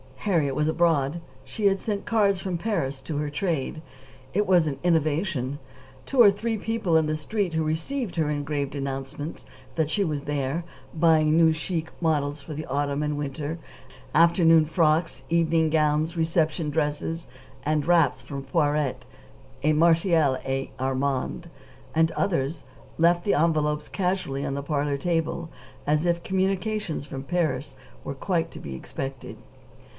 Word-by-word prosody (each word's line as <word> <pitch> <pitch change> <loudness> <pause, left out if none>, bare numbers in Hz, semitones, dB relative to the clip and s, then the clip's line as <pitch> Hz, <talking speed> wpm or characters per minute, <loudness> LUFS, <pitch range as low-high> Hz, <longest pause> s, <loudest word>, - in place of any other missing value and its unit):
Harriet 160 -9 +1
was 150 0 +1
abroad. 160 -2 +2 0.2
She 215 - -4
had 195 -1 +4
sent 205 -1 -3
cards 200 -4 +2
from 185 -2 -2
Paris 140 -9 -2
to 155 - -4
her 150 0 -1
"trade." 155 -2 -2 0.5
It 210 +2 +2
was 180 -3 +5
an 140 -3 -3
innovation. 155 -4 +1
The 145 - -16
two 265 -3 +4
or 205 -4 +9
three 220 +3 -2
people 215 -6 +1
on 160 - +3
the 155 - 0
Street 185 +4 -2
who 160 0 +1
received 175 - -2
her 160 -3 +1
engraved 145 -1 -2
announcement 135 +2 -5 0.3
that 160 -2 +1
she 200 +5 +1
was 150 -5 -2
there, 145 +2 -2 0.3
"buying 160 -1 +4
new 165 -1 +6
chic 160 0 -3
models 145 -3 0
for 155 - -8
the 155 - -5
autumn 140 +1 -1
and 150 -1 -1
winter 145 +3 -4 0.5
afternoon 165 -1 +5
frocks, 160 0 +1
evening 165 -1 +3
gowns, 155 +1 +2
reception 160 -1 +1
dresses, 160 +2 -2 0.4
and 150 0 0
wraps, 165 -7 +3
from 135 +2 -6
Poiret, 150 -4 0 0.6
Martial 160 -2 +4
et 135 0 -2
Armand, 135 +5 -1 0.5
and 160 0 +4
others," 160 -5 -1 0.3
left 170 +1 +4
the 205 - +2
envelopes 150 -2 +1
casually 180 -8 -1
on - - -2
the 140 0 -3
parlor 145 -1 0
table, 165 +1 -1 0.4
as 150 +3 +2
if 170 0 +1
communications 190 -3 -1
from 135 -2 -6
Paris 145 -4 -1 0.3
were 140 - -5
quite 170 +3 -1
to - - -9
be 70 -2 -7
expected. 135 - -6
155 Hz, 150 wpm, -26 LUFS, 145-170 Hz, 0.6 s, or